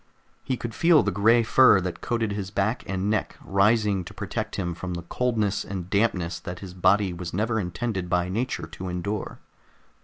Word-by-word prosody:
He 130 - -2
could 120 -1 -5
feel 165 +3 +5
the 100 - 0
gray 115 +5 +4
fur 120 -2 +6
that 90 -1 -4
coated 115 -3 -1
his 100 -2 -4
back 105 +4 0
and 95 0 -2
neck 110 -1 -1
rising 100 0 +2
to - - -11
protect - - -4
him 85 -2 -2
from 90 +1 -5
the 85 - -6
coldness 110 0 0
and 95 -2 -6
dampness 100 -5 +1
that 90 -2 -7
his 95 -1 -9
body 95 +1 +3
was 85 0 -6
never 110 +3 0
intended 95 0 -3
by 90 0 +1
nature 110 0 -2
to 90 +3 -7
endure. 95 +3 -4
100 Hz, 185 wpm, -25 LUFS, 90-110 Hz, -, fur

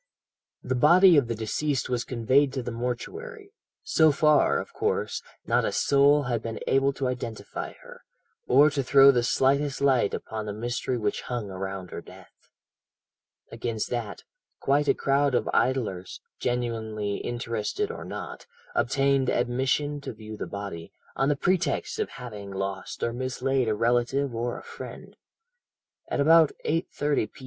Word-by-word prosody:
"The 130 - -1
body 170 +8 +6
of 140 -5 +4
the 115 - -2
deceased 130 +5 -1
was 125 -1 -1
conveyed 130 +4 +2
to 130 -2 -3
the 120 - -4
mortuary. 400 - -5 0.3
So 160 - +4
far, 150 0 +4
of - - -8
course, - - -1 0.2
not - - +2
a - - 0
soul 145 +1 +4
had 120 -4 -1
been 115 -1 -5
able 135 +1 +3
to 135 -1 -2
identify 120 -3 -5
her, - - -13 0.5
or 145 +4 +6
to 140 -1 0
throw 135 +1 +7
the 125 -3 +2
slightest 135 +3 +1
light 130 -7 +2
upon 110 -1 -6
the 105 - -3
mystery 120 +2 -2
which 105 -3 -1
hung 120 -5 -4
around 95 -1 -5
her - - -6
death. - - -17 1.0
"Against 115 -1 -3
that, 115 -4 -4 0.4
quite 145 +2 +2
a - - +4
crowd 140 -1 +1
of - - +1
idlers 110 -9 0 0.2
genuinely 110 -4 -2
interested 120 - -3
or - - -7
not - - -7 0.3
obtained 140 - +2
admission 130 +4 0
to - - -6
view 110 0 -9
the - - -5
body, 100 -5 -7 0.2
on 135 - +1
the 145 - +2
pretext 180 - 0
of 430 - -1
having 105 -5 -8
lost 95 -1 -4
or 115 - 0
mislaid 130 0 -1
a 110 - +1
relative 120 +4 +1
or 120 +1 -2
a - - -10
friend. - - -10 0.9
At - - -2
about 160 +1 +6
8.30 150 -5 0
p. - - -16
125 Hz, 155 wpm, -26 LUFS, 115-140 Hz, 1.0 s, throw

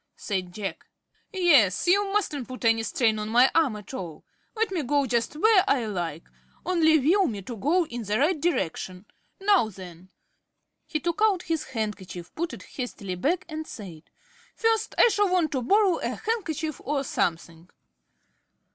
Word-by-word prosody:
said 185 -4 -3
Jack. 195 +1 -6 0.4
"Yes; 300 - +4
you 390 +3 +3
mustn't 310 - -1
put 255 -2 -7
any 225 0 +4
strain 225 0 +1
on 210 0 -4
my 245 +4 +5
arm 295 -9 +2
at 210 +4 -10
all. 170 -11 -7 0.3
Let 445 -2 0
me 360 -4 -1
go 285 +1 +1
just 235 +2 -1
where 395 +3 +5
I 260 - +2
like, 170 -6 -4 0.4
only 320 -3 +4
will 345 +7 +3
me 205 -6 -5
to 235 +5 -7
go 320 - +1
in 240 -5 -6
the 205 +2 0
right 300 +4 +1
direction. 185 - -2 0.3
Now 390 - +3
then." 185 -2 -12 0.8
He 310 - -2
took 340 +6 -3
out 405 -5 +3
his 325 -2 -2
handkerchief, 210 -8 -5
put 340 +2 -3
it - - -9
hastily 235 -8 -6
back, 310 - -1
and 315 -1 -6
said: 175 -9 -10 0.5
"First 450 -1 0
I - - +7
shall 410 -2 +2
want 345 -5 +2
to 265 - -1
borrow 390 - +3
a - - -3
handkerchief 330 - -3
or 280 0 -1
something." 170 -6 -3
275 Hz, 165 wpm, -26 LUFS, 210-350 Hz, 0.8 s, I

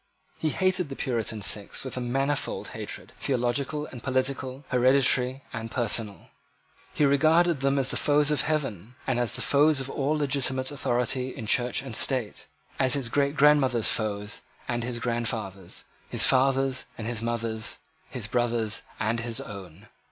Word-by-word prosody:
He 155 - +1
hated 185 -1 +1
the 135 - -5
Puritan 115 -5 -2
sects 100 0 +1
with 130 - -5
a 125 - -3
manifold 135 +4 -1
hatred, - - -7
theological 135 +4 0
and 125 -5 -9
political, 130 +1 -2
hereditary 130 +1 +3
and 115 -1 -4
personal. 115 -3 -1 0.6
He 150 - +2
regarded 160 +3 +4
them 135 +1 +1
as 135 -1 +2
the - - -1
foes 150 0 +3
of 150 - +3
Heaven, 125 - -2
as 120 -4 0
the - - -1
foes 145 +1 +4
of 135 0 -3
all 145 +3 0
legitimate 135 -2 0
authority 125 -1 0
in 115 - -7
Church 125 +3 +1
and 130 -5 -6
State, 125 -4 -1 0.3
as 130 +1 +4
his 135 -4 -1
great 140 +3 +1
grandmother's 135 -5 +4
foes 105 -1 -1 0.3
and 120 -1 -1
his 120 0 -3
grandfather's, 115 -6 -3 0.3
his - - +4
father's 135 0 +3
and 110 - -5
his 115 -1 -2
mother's, 115 -1 -2 0.3
his - - -4
brother's 115 -2 0 0.2
and 115 +2 0
his 115 0 -2
own. 100 -3 -9
130 Hz, 155 wpm, -27 LUFS, 115-140 Hz, 0.6 s, regarded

